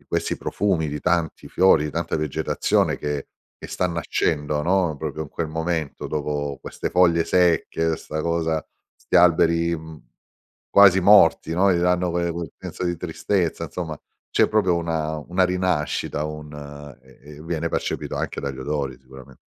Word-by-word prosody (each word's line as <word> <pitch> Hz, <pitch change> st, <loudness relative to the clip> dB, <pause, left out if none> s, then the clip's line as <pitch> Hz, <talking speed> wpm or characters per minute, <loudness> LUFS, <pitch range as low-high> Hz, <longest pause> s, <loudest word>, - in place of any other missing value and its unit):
di -, -, -28 dB
questi -, -, -1 dB
profumi, 90 Hz, -7 st, -1 dB
di 75 Hz, +1 st, -4 dB
tanti 85 Hz, -2 st, -1 dB
fiori, 90 Hz, -5 st, +4 dB
di 75 Hz, -, -3 dB
tanta 80 Hz, +2 st, -2 dB
vegetazione 75 Hz, -3 st, 0 dB
che 75 Hz, -1 st, -4 dB, 0.3 s
che -, -, -7 dB
sta 90 Hz, -, -1 dB
nascendo, 75 Hz, -3 st, -1 dB
no, 90 Hz, -2 st, +1 dB
proprio 75 Hz, 0 st, -4 dB
in 75 Hz, -, -8 dB
quel 80 Hz, -, -3 dB
momento 80 Hz, -1 st, -3 dB
dopo 75 Hz, -2 st, -3 dB
queste -, -, -5 dB
foglie 85 Hz, -2 st, +4 dB
secche, 80 Hz, -2 st, +2 dB
'sta 80 Hz, +1 st, -5 dB
cosa 80 Hz, -1 st, -1 dB, 0.3 s
'sti -, -, -9 dB
alberi, 85 Hz, -1 st, +4 dB
mhmm, 80 Hz, -1 st, -11 dB, 0.7 s
quasi 100 Hz, -2 st, +7 dB
morti, 100 Hz, -4 st, +5 dB
no, 95 Hz, +2 st, +4 dB
gli 85 Hz, -, +1 dB
danno 90 Hz, 0 st, +2 dB
que 85 Hz, 0 st, -1 dB
quel 85 Hz, -2 st, -5 dB
senso -, -, -7 dB
di 85 Hz, -1 st, -1 dB
tristezza 85 Hz, 0 st, -1 dB
insomma, 80 Hz, -1 st, -5 dB, 0.4 s
c'è -, -, +4 dB
proprio 100 Hz, -5 st, +2 dB
una 80 Hz, -2 st, -2 dB
una 90 Hz, +5 st, 0 dB
rinascita, 90 Hz, -5 st, -1 dB
un 75 Hz, -1 st, -7 dB, 0.5 s
e 65 Hz, +1 st, -20 dB, 0.2 s
e 75 Hz, -, -11 dB
viene 85 Hz, 0 st, -2 dB
percepito -, -, -3 dB
anche -, -, -3 dB
dagli 70 Hz, -2 st, -5 dB
odori 70 Hz, -2 st, -3 dB
sicuramen 65 Hz, 0 st, -14 dB
80 Hz, 160 wpm, -23 LUFS, 75-90 Hz, 0.7 s, quasi